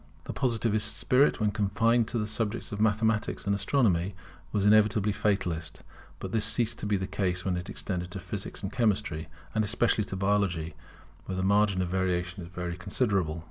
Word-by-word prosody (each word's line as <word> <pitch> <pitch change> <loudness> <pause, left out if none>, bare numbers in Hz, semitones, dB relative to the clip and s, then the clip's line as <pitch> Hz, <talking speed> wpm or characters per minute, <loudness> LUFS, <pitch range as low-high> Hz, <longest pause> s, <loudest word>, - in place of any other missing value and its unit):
The - - -6
Positive 115 -4 +1
spirit, 125 +7 +2
when 105 -2 +2
confined 110 +3 +2
to 120 - -2
the 105 - 0
subjects 110 +1 -2
of 105 0 -3
Mathematics 110 0 +1
and 100 - +1
Astronomy, 100 -4 +1 0.4
was 100 -2 0
inevitably 105 0 +4
fatalist; 85 -6 -1 0.3
but - - -6
this 110 -2 +1
ceased 115 +1 +1
to - - -3
be 105 -1 +2
the 95 - -3
case 95 -2 -2
when 95 -2 0
it 90 +1 -5
extended 90 -3 -4
to - - -6
Physics - - -6
and 95 +2 -4
Chemistry, 100 -9 0 0.3
and 110 - +2
especially 110 +1 +2
to 95 - -5
Biology, 95 -4 0 0.5
where 95 - -3
the 95 - -1
margin 100 -1 +3
of 90 - -3
variation 90 0 -1
is 85 - -8
very 90 -1 -5
considerable. 95 -5 0
100 Hz, 180 wpm, -28 LUFS, 90-110 Hz, 0.5 s, inevitably